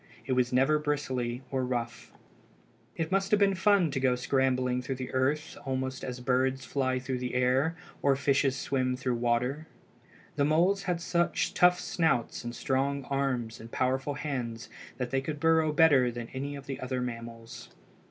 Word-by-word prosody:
It 130 - -4
was 125 -1 +2
never 135 +4 +3
bristly 130 -4 -2
or 130 -1 0
rough. 120 -2 -4 0.8
It 165 0 -3
must 195 0 +1
have 210 - +4
been 200 -1 +4
fun 190 -3 +3
to 135 - -1
go 130 -1 +2
scrambling 125 -1 +1
through 130 +1 -4 0.2
earth 140 +4 0
almost 130 -1 -3
as 125 -1 -5
birds 130 +1 +1
fly 130 +1 0
through 130 0 -3
air 130 +6 +2 0.3
or 140 -1 +3
fishes 135 -1 +2
swim 130 -2 0
through 130 -1 -1
water. 125 +6 0 0.7
The 140 - +3
moles 175 +6 +3
had 175 -1 0
such 170 0 0
tough 180 0 +5
snouts 160 -12 0
and 120 0 -5
strong 135 +2 0
arms 130 -5 -1
and 115 +1 -11
powerful 130 +2 0
hands 120 -7 -4 0.3
that 125 -1 -3
they 135 0 +1
could 150 +1 -5
burrow 160 -1 +3
better 145 -5 +5
than 120 -1 -6
any 140 +2 -4
of 140 -1 -9
the 135 - -5
other 130 0 -3
mammals. 115 -2 -7
130 Hz, 165 wpm, -29 LUFS, 125-150 Hz, 0.8 s, tough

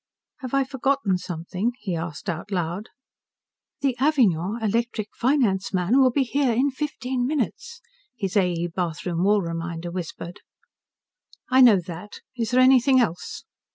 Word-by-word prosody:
"Have 260 -1 -4
I 275 - +3
forgotten 265 -7 0
something?" 180 +6 -3
he 190 -8 -4
asked 165 +1 -6
out 170 +2 -4
loud. 180 +2 -3 0.9
"The 270 -3 +1
Avignon 225 - +2
Electric 225 0 -1
finance 235 -6 +1
man 185 +9 +2
will 260 -1 +6
be 270 +2 +1
here 265 -1 +1
in 265 +5 +2
fifteen 260 -3 -3
minutes," 310 - -3 0.4
his 195 -5 -3
A. 185 -3 +3
E. 170 0 -2
bathroom 170 0 -3
Wall 205 0 +3
reminder 165 0 -4
whispered. 175 0 -6 1.1
"I 260 +1 +6
know 230 -6 +7
that. 180 +3 -9
Is 230 -3 -2
there 250 +1 +4
anything 260 0 +5
else?" 180 -8 -2
215 Hz, 145 wpm, -24 LUFS, 175-260 Hz, 1.1 s, know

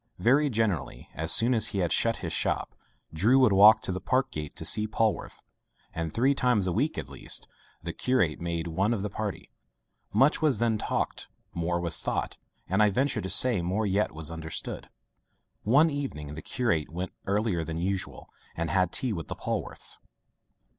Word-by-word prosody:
Very 140 +5 +3
generally, 105 - -2
as 80 +1 +2
soon 115 +9 +6
as 115 -2 +3
he - - -4
had 90 -3 0
shut - - +3
his - - -2
shop, - - 0 0.4
Drew 105 +11 +4
would 130 -6 +5
walk 105 +3 +7
to - - -3
the 90 0 -4
park 130 +6 0
gate 75 -1 -6
to - - -5
see 105 0 +4
Polwarth; 110 0 -1 0.5
and 80 -1 -3
three 130 - +2
times 125 -7 +2
a 90 - 0
week - - 0
at - - -4
least, - - -3 0.4
the - - -4
curate 125 -13 0
made 85 -1 -3
one 95 +7 0
of 100 - -4
the 105 - -3
party. 105 -1 -5 0.6
Much 140 +5 +3
was 150 -7 +2
then 115 -1 +1
talked, - - -2 0.3
more 85 +1 -1
was 85 -2 -2
thought, - - -3 0.3
and 95 +4 +1
I 105 - +5
venture 130 +8 0
to 95 - -5
say, 120 -5 +3
more 95 +6 -1
yet 100 +1 +1
was 80 0 -8
understood. 80 -1 -5 0.7
One 145 +9 +4
evening 105 - -5
the 80 - -7
curate 115 - -1
went 90 +3 -5
earlier 100 -4 0
than 80 0 -5
usual, 95 +2 -3 0.3
and 85 -1 -2
had 90 0 +2
tea 130 -4 -2
with 85 -4 -5
the - - -5
Polwarths. - - -3
100 Hz, 185 wpm, -27 LUFS, 85-120 Hz, 0.7 s, walk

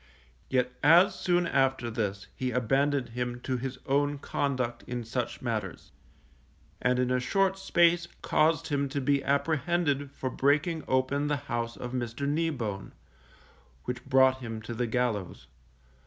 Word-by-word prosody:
Yet 125 -1 +1
as 170 +6 +6
soon 175 -1 +1
after 135 -6 +1
this 100 -3 -2
he 130 - -2
abandoned 135 +2 +1
him 120 +1 -3
to 130 0 -2
his 130 +1 -5
own 145 +1 +1
conduct 130 -4 -2
in 120 -1 -3
such 120 +2 -4
matters, 110 -6 -4 0.9
and 125 0 +2
in 125 0 +1
a 125 - +2
short 190 +9 +1
space 175 -2 +3 0.2
caused 160 +1 +2
him 140 -1 0
to 140 +1 -2
be 140 +1 +1
apprehended 145 0 0
for 130 -2 -4
breaking 150 +3 +1
open 130 +3 +1
the 145 -1 +1
house 120 -4 -4
of 125 - -6
Mr. 125 +2 -3
Kneebone, 140 -11 -2 0.9
which 125 0 -4
brought 130 -1 +4
him 115 -3 -5
to 120 - -5
the 120 +1 -1
gallows. 115 -5 -2
130 Hz, 145 wpm, -29 LUFS, 120-145 Hz, 0.9 s, as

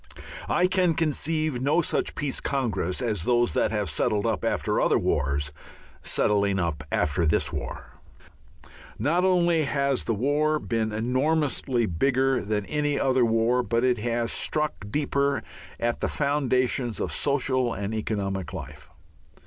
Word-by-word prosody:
I 180 - +3
can 185 -3 +2
conceive 155 -3 0
no 150 +6 +2
such - - -1
Peace 145 -2 -2
Congress 110 -7 -1
as 110 -7 0
those 120 +4 +2
that - - +2
have 105 -2 -1
settled 100 +7 0
up 110 -3 -1
after - - 0
other - - +3
wars, 70 +1 0 0.5
settling 100 -1 +1
up 85 -5 -2
after 80 +3 +1
this - - +1
war. - - -6 1.0
Not 160 - +1
only 175 -4 +3
has 140 -1 0
the 115 - 0
war 145 +6 +1
been 115 -6 -2
enormously 130 +2 0
bigger 130 +8 +1
than 105 -1 -2
any 145 +1 -1
other 130 -2 +2
war, 115 +2 +2
but 115 -1 0
it 125 -3 +2
has 115 +1 -1
struck 150 -1 0 0.2
deeper 140 +1 0 0.4
at 120 0 -1
the - - 0
foundations 130 -4 0
of - - -2
social 130 -3 +1
and 100 +1 -4
economic 100 -5 -3
life. - - -9
125 Hz, 140 wpm, -26 LUFS, 105-145 Hz, 1.0 s, I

